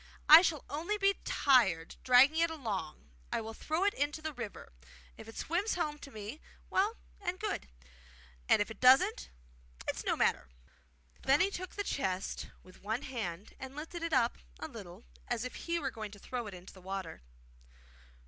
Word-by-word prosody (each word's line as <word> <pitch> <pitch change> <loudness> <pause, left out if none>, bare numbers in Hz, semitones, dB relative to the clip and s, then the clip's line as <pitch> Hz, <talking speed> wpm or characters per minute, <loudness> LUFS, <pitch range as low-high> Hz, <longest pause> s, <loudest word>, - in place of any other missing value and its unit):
I 315 +2 +12
shall 330 -5 0
only 335 +9 -2
be 395 -1 +3
tired, 190 - +3
dragging 260 +5 +6
it 335 0 +4
along; 220 - -5 0.2
I - - +1
will 225 0 -6
throw 315 +9 -1
it 405 0 +3
into 290 +2 -1
the 315 0 -4
river. 235 - -7 0.4
If - - -11
it 225 - -10
swims 370 +7 0
home 300 -4 -2
to 280 - -10
me, 220 +5 -8 0.3
well 410 +4 +2 0.3
and 365 -1 -3
good; 425 - -3 0.8
and - - +6
if 215 - -12
it 220 - -10
doesn't, 265 - +5 0.6
it's - - -2
no - - +1
matter.' - - +1 0.7
Then 270 +2 +4
he 385 +2 +3
took 370 -1 -6
the 405 - -1
chest 190 - -2 0.2
with 185 - -17
one 220 +5 -2
hand 205 -7 -5
and 265 +1 -8
lifted 325 +3 -6
it 335 0 -2
up 245 -4 +2 0.2
a - - -4
little, - - -10 0.2
as 230 - -1
if 255 - -5
he 340 0 -2
were 315 - -2
going 215 -1 -6
to 205 - -12
throw 240 +2 -4
it 200 - -7
into 180 +1 -12
the 185 - -14
water. 190 - -5
270 Hz, 185 wpm, -33 LUFS, 215-335 Hz, 0.8 s, I